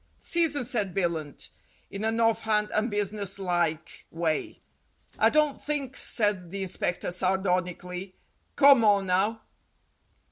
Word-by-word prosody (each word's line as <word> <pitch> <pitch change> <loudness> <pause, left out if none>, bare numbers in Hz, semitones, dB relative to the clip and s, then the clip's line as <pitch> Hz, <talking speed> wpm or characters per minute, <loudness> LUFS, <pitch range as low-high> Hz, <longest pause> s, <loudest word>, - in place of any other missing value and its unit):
"Season," 310 -6 +1
said 210 -6 -2
Billunt, 170 -6 -3 0.4
in 200 +2 -5
an 225 +1 0
off 225 -1 +2
hand 210 -1 0
and 215 +3 +1
business 205 -1 -2
like 175 -4 -2
way. 165 -1 -2 0.6
"I - - +5
don't 300 -2 +1
think," 280 -3 -3
said 205 -6 0
the 195 +2 -4
inspector 180 -1 -3
sardonically; 180 0 -2 0.4
"come 275 -4 +7
on 200 -2 +4
now." 200 +5 0
200 Hz, 120 wpm, -27 LUFS, 180-225 Hz, 0.6 s, come